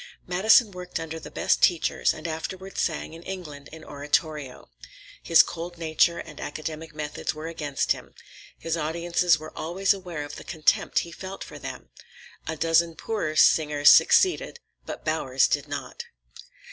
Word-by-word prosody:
Madison 210 +5 +4
worked 180 -2 -6
under 165 0 -6
the - - -10
best - - +1
teachers, 175 -3 +3
and 155 - -6
afterward 185 +4 -6
sang 160 -1 -2
in 165 - -10
England 160 -7 -8
in 160 0 -11
oratorio. 145 -1 -2 0.5
His 165 - +6
cold 175 +1 -7
nature 165 +1 +2
and 155 - -9
academic 155 +1 -6
methods 150 +1 -4
were 155 +1 -7
against 155 -4 -2
him. - - -3 0.4
His 165 0 -2
audiences 170 +2 +1
were 155 0 -11
always 185 +5 +1
aware 180 -6 -6
of 145 - -8
the - - -9
contempt 155 -3 0
he 170 - -11
felt 190 +3 -7
for - - -10
them. - - -8 0.6
A 160 - -2
dozen 165 +1 +2
poorer 180 -8 -3
singers 150 -2 +5
succeeded, 375 +5 +4 0.3
but - - -7
Bowers 135 -5 +2
did 145 0 -1
not. 145 0 -6
160 Hz, 155 wpm, -25 LUFS, 155-175 Hz, 0.6 s, His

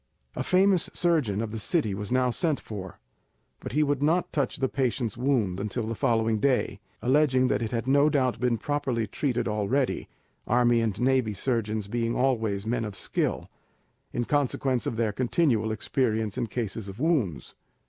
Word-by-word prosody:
A - - -2
famous 185 -1 +3
surgeon 150 - +1
of 110 - -5
the 110 - -4
city 110 - 0
was 105 +2 -5
now 125 -1 +2
sent 155 +3 0
for, 95 -4 -8 0.6
but - - -7
he 150 - +3
would 145 -2 0
not 165 +4 +1
touch 140 -4 0
the 135 - +1
patient's 125 -4 -1
wound 120 -8 0
until 105 +3 -2
the 110 +1 -3
following 110 0 +1
day, 125 -5 +1 0.2
alleging 130 -1 +3
that - - +1
it 115 - -1
had 115 -1 -2
no 140 +3 +4
doubt 130 -6 +1
been 120 -1 +1
properly 135 -4 -1
treated 125 +3 -1
already, 110 +6 0 0.4
army 120 0 +3
and 110 -4 -1
navy 125 -3 +2
surgeons 110 -4 -1
being 115 +2 -1
always 110 -6 0
men 115 +1 -1
of 105 -2 -5
skill, - - -2 0.6
in 120 - -2
consequence 135 -2 0
of - - -2
their 110 -1 0
continual 120 -1 +1
experience 110 -2 -1
in 120 - -1
cases 110 -2 -4
of 100 +4 -9
wounds. 135 - 0
120 Hz, 170 wpm, -27 LUFS, 110-135 Hz, 0.6 s, no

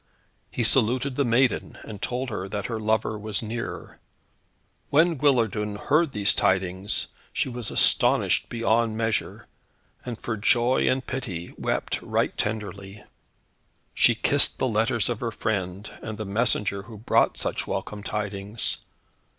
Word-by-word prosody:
He 120 - -2
saluted 125 +3 +3
the 140 - +2
maiden, 125 +1 +1
and 105 -2 -9
told 125 0 -2
her 95 -2 -4
that 100 0 -3
her 115 -2 -3
lover 110 0 0
was 110 +1 -3
near. 115 +2 -6 0.9
When 165 +4 +4
Guillardun 115 -7 +1
heard 150 +8 +2
these 105 -3 +1
tidings 95 +1 +1 0.2
she - - -1
was 120 -2 -5
astonied - - +3
beyond 115 -1 +1
measure, 110 -1 -1 0.6
and 120 -3 -6
for 110 -2 -3
joy 120 +4 +3
and 130 0 +1
pity 95 -10 -5
wept - - -2
right - - 0
tenderly. 105 -2 -4 0.9
She - - +4
kissed - - +3
the 130 - +1
letters 115 -1 +1
of 120 -3 -2
her 120 - -2
friend, 100 -3 -3
and 110 -1 -6
the 110 - -4
messenger 100 -1 +1
who 110 +2 -11
brought 110 - +2
such - - -2
welcome 105 -1 -4
tidings. 105 +1 -2
110 Hz, 140 wpm, -25 LUFS, 105-120 Hz, 0.9 s, When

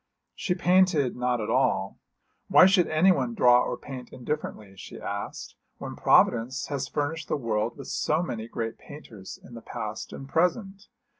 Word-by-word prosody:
She 180 - -2
painted 180 -7 +3
not 125 0 0
at 105 - -3
all. - - 0 0.5
Why - - +7
should 190 -2 +4
anyone 155 -7 +2
draw 125 +1 +5
or - - -2
paint 130 -2 -9
indifferently, 120 -7 -5
she - - -10
asked, 100 0 -6 0.2
when - - -7
Providence 125 +3 +2
has 140 -2 -3
furnished 155 +2 -3
the - - -1
world 115 -2 -2
with 140 - -9
so 155 +3 0
many 115 -8 -5
great 115 -1 -5
painters 110 -10 -11
in 120 - -14
the 115 - -9
past 110 -1 -6
and 135 - -8
present? 195 - -1
130 Hz, 160 wpm, -26 LUFS, 115-165 Hz, 0.5 s, Why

